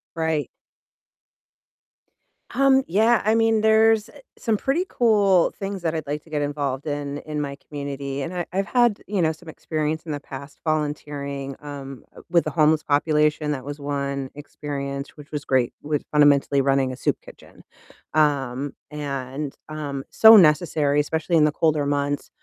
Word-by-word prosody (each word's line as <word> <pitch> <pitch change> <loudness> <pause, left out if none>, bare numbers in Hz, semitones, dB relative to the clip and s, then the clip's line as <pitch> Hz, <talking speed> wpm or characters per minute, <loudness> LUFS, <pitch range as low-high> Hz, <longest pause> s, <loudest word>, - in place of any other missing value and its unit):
Right. 160 -2 -1 2.1
Um, 270 -1 +4
yeah, 220 +6 +3
I 215 - +3
mean, 225 -1 +3
there's 220 0 +4 0.3
some 225 -2 0
pretty 280 - 0
cool 205 -6 +3
things 195 -2 -5
that 165 -1 -1
I'd 155 -1 -3
like 150 +2 -4
to 165 - -20
get 150 -1 -2
involved 145 -1 -3
in 145 -1 -3
in 150 -1 -4
my 140 -1 -5
community, 140 -1 -5
and 175 +6 -5
I 175 - -2
I've 195 +1 0
had, 240 -4 +2
you 200 -1 -2
know, 160 -1 +2
some 160 +1 -12
experience 155 0 -3
in 155 - -5
the 145 - -3
past 140 +1 -10
volunteering, 145 -3 -3
um, 140 -3 -8 0.3
with 170 -1 +3
the - - -3
homeless 155 -1 +3
population. 150 +1 +1
That 135 -2 -4
was 145 +1 -6
one 140 -1 -3
experience 140 -1 -6
which 145 0 -13
was 145 -1 -4
great, 130 -3 +1
with 150 -1 -2
fundamentally 145 -2 +4
running 135 -1 +1
a - - -9
soup - - 0
kitchen. - - -16 0.5
Um, 140 -3 +1 0.2
and 140 -1 -4
um, 145 -3 -5
so 220 0 +9
necessary, 150 -3 +3
especially 160 +3 0
in 150 - +5
the 150 - +2
colder 150 -1 +1
months, 145 0 -1
150 Hz, 160 wpm, -23 LUFS, 140-165 Hz, 2.1 s, so